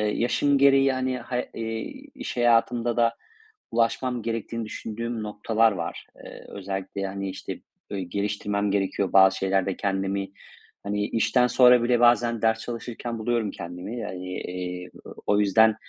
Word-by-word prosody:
yaşım 140 +4 +2
gereği, 135 0 +5
hani, 130 0 -1
ha 125 +1 -4 0.2
eee, 115 0 -3 0.4
iş 265 - -6
hayatımda 120 0 +2
da 115 -1 +3 0.6
ulaşmam 120 +2 0
gerektiğini 115 0 -3
düşündüğüm 115 +1 -5
noktalar 110 +2 +2
var. 85 -4 -5 0.2
Eee, - - -11
özellikle, 95 0 -4
hani, 100 0 -4
işte, - - -6 0.3
böyle, 100 -2 -2
geliştirmem 100 +2 -1
gerekiyor 95 -1 0
bazı 95 0 +6
şeylerde 95 0 0
kendimi. 95 0 -1 0.5
Hani, 105 0 -1
işten 125 +2 +2
sonra 125 0 +6
bile 120 0 +3
bazen 120 -1 +4
ders 110 0 +2
çalışırken 120 0 -5
buluyorum 110 -2 0
kendimi. 90 +7 -6
Hani, 90 0 -6
eee, 90 0 -5 0.2
o - - -9
o 105 - +3
yüzden, 110 +2 +5
110 Hz, 140 wpm, -25 LUFS, 100-120 Hz, 0.6 s, bazı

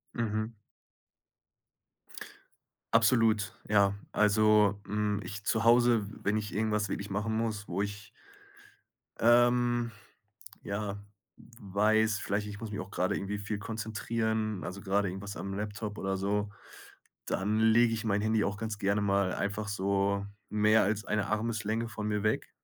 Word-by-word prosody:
Mhm. 110 -1 -2 2.4
Absolut, 115 -2 +3
ja. 100 -1 +3 0.2
Also, 105 -1 +4
hm, 105 -1 -1
ich 105 -1 -7
zu 110 +1 +1
Hause, 120 -2 +5 0.2
wenn 105 +2 +1
ich 105 -1 -4
irgendwas 105 -1 0
wirklich 100 +1 -4
machen 105 +3 -1
muss, 110 -2 -2
wo 90 +3 -2
ich 100 0 -5 1.1
ähm, 120 0 +4 0.7
ja, 100 0 -3 0.6
weiß, 105 +1 +2
vielleicht, 105 +1 -2
ich 100 -1 -7
muss 110 -1 -6
mich 105 - -4
auch 110 - -6
grade 95 +1 0
irgendwie 100 +1 -3
viel 105 0 -4
konzentrieren, 110 -1 -2
also 95 +4 -6
grade 100 +1 +1
irgendwas 100 +2 -6
am 95 0 -5
Laptop 105 +1 -4
oder 95 -1 -2
so, 100 +1 -1 0.8
dann 105 +3 0
lege 115 +1 +5
ich 115 0 -3
mein 100 -1 +1
Handy 110 0 +2
auch 100 0 -2
ganz 110 0 -4
gerne 100 +1 +1
mal 100 -2 +1
einfach 100 +1 -2
so 100 0 0 0.2
mehr 105 +1 +4
als 105 +1 -1
eine 105 -1 -1
Armeslänge 110 +1 -1
von 110 -1 -4
mir 105 -1 -1
weg. 110 - 0
105 Hz, 140 wpm, -30 LUFS, 100-110 Hz, 2.4 s, Hause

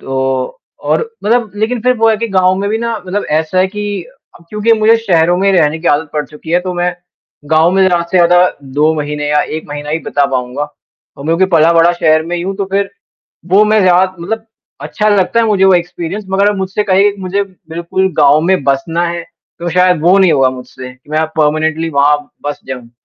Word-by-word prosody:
तो 130 -1 -3 0.3
और - - +2 0.2
मतलब 230 -1 +1
लेकिन 225 +4 -1
फिर 250 +2 +2
वो 225 0 +3
है 220 - +2
कि 230 +2 -3
गाँव 185 0 +4
में 200 +1 -2
भी 220 - 0
ना 230 0 -2
मतलब 200 +3 -3
ऐसा 160 +3 -3
है 185 - +3
कि 205 -1 -4 0.3
अब 170 - -18
क्योंकि 210 +2 +2
मुझे 220 +1 +4
शहरों 175 -5 +2
में 195 +1 +2
रहने 160 -3 +2
की 170 - -2
आदत 145 +1 +1
पड़ 150 -1 -2
चुकी 155 +1 -10
है, 175 - +3
तो 180 0 -5
मैं 175 0 -1 0.6
गाँव 160 +2 +4
में 190 +1 +2
ज़्यादा 175 -2 +1
से 185 - +3
ज़्यादा 175 +1 +4 0.2
2 150 +3 +2
महीने 150 -1 -3
या 150 0 +2 0.2
1 160 - -9
महीना 145 0 -6
ही 160 +2 -1
बीता 145 -3 0
पाऊँगा, 130 +3 -2 0.6
क्योंकि 165 +4 +2
पला-बढ़ा 165 +1 +4
शहर 155 -2 +2
में 175 +1 -3
ही 175 - -3
हूँ। 195 +2 -4
तो 195 0 -3
फिर 200 0 0 0.6
वो 205 +2 +6
मैं 215 0 +3
ज़्यादा 185 0 +3
मतलब 220 +6 -4 0.4
अच्छा 215 0 -1
लगता 205 +2 +2
है 230 - +2
मुझे 205 -3 +2
वो 190 0 +5
एक्सपीरियंस 175 +3 -3
मगर 200 +2 +2
मुझसे 190 +2 -2
कहिए 200 +1 +3
मुझे 190 +2 -1
बिल्कुल 185 0 -4
गाँव 145 +1 +5
में 185 -2 +1
बसना 140 +6 0
है, 170 0 -4 0.4
तो 175 0 -3
शायद 180 -1 +2
वो 180 +4 +4
नहीं 190 -3 +4
होगा 135 -2 +3
मुझसे 130 0 -10
कि 125 +3 -25
मैं 155 +1 0
परमानेंटली 155 +1 0
वहाँ 145 0 +3 0.3
बस 145 - -3
जाऊँ। 125 -3 -7
175 Hz, 210 wpm, -13 LUFS, 155-195 Hz, 0.6 s, वो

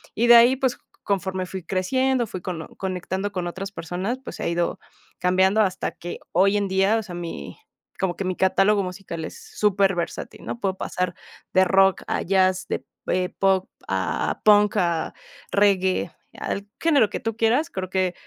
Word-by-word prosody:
Y 235 - +2
de 240 - +9
ahí, 240 +3 +7
pues, 260 -2 0 0.3
conforme 190 -2 -1
fui 190 -1 -6
creciendo, 245 +8 +1
fui 185 - -6
cono 170 -3 -5
conectando 190 +1 -3
con 180 -3 -3
otras 195 +3 -5
personas, 190 +8 -3
pues, - - -8
he - - -1
ido 170 0 -1 0.4
cambiando 190 +3 +3
hasta 190 -3 0
que, 175 - -7
hoy 195 +4 +4
en 200 -1 0
día, 195 +3 +3
o 220 - -2
sea, 180 -4 -8
mi 165 - -6 0.4
como 185 -2 0
que 190 - -4
mi 185 -1 -1
catálogo 195 +2 +3
musical 180 -3 -6
es - - -9 0.2
superversatil, 195 -4 0
¿no? 230 - -5
Puedo 190 -3 -1
pasar 180 -2 -2 0.4
de 185 0 +6
rock 190 0 +4
a - - -1
jazz, 185 0 +2
de, - - -3 0.2
eh, 180 0 +1
pop, 190 -1 +1 0.2
a 95 -1 -1
punk, 210 -1 +5
a 170 -2 0 0.4
reggae, 190 -3 +2 0.3
al 200 +1 -3
género 285 -10 +4
que - - -4
tú 225 0 -3
quieras. 240 +8 +2
Creo 185 - -4
que 185 -1 0
190 Hz, 175 wpm, -24 LUFS, 180-205 Hz, 0.4 s, de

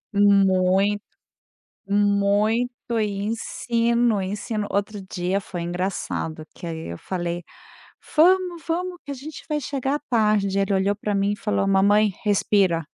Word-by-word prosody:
Muito, 195 0 +4 0.9
muito 205 +3 +2 0.3
e 200 -2 -1
ensino, 230 0 0
ensino. 205 +2 -3
Outro 200 +1 -2
dia 185 +2 -1
foi 175 -3 -6
engraçado, 175 -3 -3
que 175 - -8
aí 160 - -5
eu 85 - -9
falei: 175 -1 -3 0.7
"Vamos, 350 +1 +4
vamos 355 +2 -2
que 285 - -6
a - - -2
gente 285 +4 -9
vai 300 -1 -1
chegar 275 +1 -2
tarde". 210 -5 +2
Ele 195 0 +1
olhou 195 +1 +2
pra 210 0 -3
mim 200 +1 +1
e - - -4
falou: 210 -2 0
"Mamãe, 205 +2 +4
respira". 195 -4 +2
205 Hz, 135 wpm, -23 LUFS, 195-230 Hz, 0.9 s, Muito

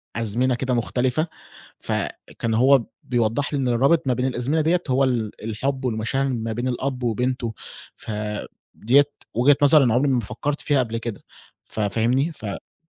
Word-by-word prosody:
أزمنة 115 +3 +1
كده 130 +1 -1
مختلفة، 125 +6 0 0.5
فكان 115 -1 -3
هو 130 +3 +5 0.2
بيوضّح 120 +4 0
لي 145 - 0
إن 130 - 0
الرابط 135 +6 +3
ما 130 - +3
بين 125 +1 -1
الأزمنة 130 +5 0
ديّة 170 +3 +2
هو 130 +1 +3
ال 120 -5 0
الحب 130 +5 -2
والمشاعر 120 +4 0
ما 115 -4 -2
بين 120 +3 -2
الأب 130 +1 -2
وبنته، 120 0 -1 0.4
فديّة 105 +5 -1 0.3
وجهة 130 +5 +5
نظر 145 0 +7
أنا 120 -4 +3
عمري 135 +3 +2
ما 125 - +2
فكرت 125 +7 -3
فيها 145 -2 +2
قبل 115 -2 -1
كده 115 -2 -6 0.4
ف - - -7
فاهمني؟ 115 +8 +1
فاللي 105 -8 -8
125 Hz, 160 wpm, -23 LUFS, 115-135 Hz, 0.5 s, نظر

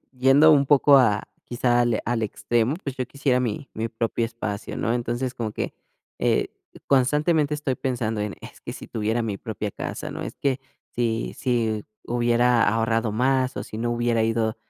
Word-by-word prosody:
yendo 135 +4 +6
un 140 -2 +4
poco 140 0 +6
a 110 -5 +3 0.2
quizá 120 0 +1
al 120 -2 +2
al 115 -1 -1
extremo, 115 +4 0
pues, 135 -2 -4
yo 130 - -2
quisiera 135 -1 0
mi 125 +2 -3
mi 110 +1 -2
propio 115 +1 -1
espacio, 110 -3 -5
¿no?, 115 - 0
entonces, 120 +1 -2
como 115 -4 -3
que, - - -3 0.5
eh, - - +1 0.4
constantemente 150 +3 +2
estoy 145 -3 -2
pensando 120 -5 -2
en, 105 -1 -3
es - - -12
que - - -6
si - - -9
tuviera 110 +2 -1
mi 110 -3 -2
propia 105 -2 -4
casa, - - -5
¿no?, - - -5
es - - -7
que 135 -2 0 0.3
si 115 -1 -1
si 115 -4 0 0.2
hubiera 120 0 +3
ahorrado 115 0 +1
más, 130 +3 +1
o - - -2
si - - -8
no 120 +1 -1
hubiera 120 -1 +1
ido, 110 0 0
120 Hz, 180 wpm, -24 LUFS, 115-130 Hz, 0.5 s, yendo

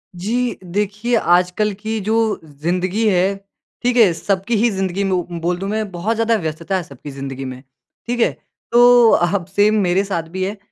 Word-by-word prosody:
जी। 235 +7 -1
देखिए 210 +6 -1
आजकल 180 +2 +2
की 220 +1 -3
जो 220 +1 +1
ज़िंदगी 180 +8 -1
है, 190 0 +2 0.5
ठीक 245 0 +1
है? 210 -7 +6
सबकी 195 +6 -1
ही 235 +3 +3
ज़िंदगी 190 0 -2
में 195 - -1
उ 180 -1 +1 0.2
बोल 175 +1 0
दूँ 195 +2 -4
मैं 215 0 -2
बहुत 190 +6 -2
ज़्यादा 230 0 +2
व्यस्तता 165 0 -3
है 180 - -3
सबकी 140 0 -11
ज़िंदगी 135 -1 -6
में, 130 0 -7 0.5
ठीक 245 0 -2
है? 230 - +3 0.4
तो 240 -1 +7
अब 175 +1 +2
सेम 210 +1 +4
मेरे 185 +1 +2
साथ 190 -5 -2
भी 185 +2 -3
है 200 +3 -3
195 Hz, 185 wpm, -19 LUFS, 175-220 Hz, 0.5 s, तो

